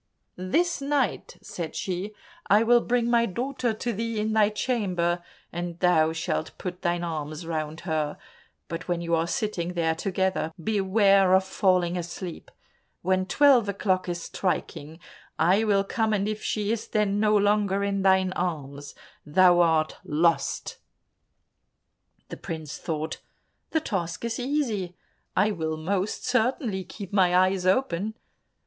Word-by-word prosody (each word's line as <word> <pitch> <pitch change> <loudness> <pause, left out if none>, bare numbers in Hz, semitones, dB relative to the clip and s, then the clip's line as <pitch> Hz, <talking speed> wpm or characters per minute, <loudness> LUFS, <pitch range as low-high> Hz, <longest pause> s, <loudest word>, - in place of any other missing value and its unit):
This 310 - 0
night," 275 -5 -1
said 165 -3 -6
she, 190 +3 -3 0.3
"I 210 +3 +5
will 240 +1 +5
bring 240 -1 +1
my 235 -1 +3
daughter 245 +4 -2
to 230 +2 -3
thee 225 +1 -2
in 215 +1 -1
thy 215 -1 +4
chamber, 185 -7 -1 0.3
and 175 0 -4
thou 160 -4 +4
shalt 160 -1 -3
put 180 -1 -6
thine 175 -1 0
arms 155 -1 -4
round 160 -1 -4
her, 155 -4 -2 0.5
but 165 +1 -6
when 175 -1 -1
you 170 0 -2
are 165 0 +2
sitting 180 -2 -2
there 165 -2 +1
together, 190 -1 -1
beware 195 0 +3
of 190 - +4
falling 185 -2 +1
asleep. 175 0 -7 0.5
When 185 +1 +1
twelve 265 -7 +5
o'clock 185 -2 0
is 175 -1 -3
striking, 160 -4 -3 0.4
I 185 +7 +3
will 200 -2 +3
come, 220 +1 0
and 200 -1 0
if 215 0 -3
she 210 -1 -1
is 230 -1 -2
then 205 -1 +1
no 210 0 +4
longer 205 -1 +2
in 200 -1 0
thine 190 -1 +3
arms, 145 -6 -4 0.3
thou 175 +3 +5
art 160 -2 +2
lost." 165 +3 0 1.5
The - - -7
prince 160 -3 -6
thought, 160 -2 -4 0.5
"The 320 - +1
task 180 - -3
is 230 0 -3
easy, 240 - -1 0.4
I 205 +3 +4
will 160 -4 -3
most 190 +5 -2
certainly 220 - 0
keep 200 +1 -9
my 180 -3 +4
eyes 185 0 +2
open." 200 0 +1
190 Hz, 145 wpm, -26 LUFS, 170-215 Hz, 1.5 s, I